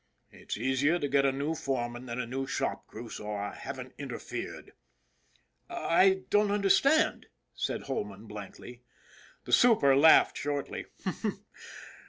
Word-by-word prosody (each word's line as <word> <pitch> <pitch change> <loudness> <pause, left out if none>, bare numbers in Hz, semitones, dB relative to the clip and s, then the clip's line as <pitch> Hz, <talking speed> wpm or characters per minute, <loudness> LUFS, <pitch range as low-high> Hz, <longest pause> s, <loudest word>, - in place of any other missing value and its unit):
It's - - -6
easier 135 +7 +2
to 145 - -2
get 140 0 +3
a - - +3
new 140 +4 -2
foreman 125 -4 -3
than 120 +1 -4
a 125 - -1
new 135 +3 -4
shop - - -3
crew, - - -9
so 105 0 -6
I 100 0 -4
haven't 130 -2 -7
in 140 -2 -6
terfered." 120 - -6 0.6
" - - -40
I 190 +3 +3
don't 210 0 +4
understand," 210 +10 +3 0.3
said - - -3
Holman 105 -6 -5
blankly. 105 +3 -10 0.6
The - - -4
super 210 - +6
laughed 155 +4 +6
shortly. 145 0 -3
135 Hz, 140 wpm, -30 LUFS, 120-160 Hz, 0.6 s, super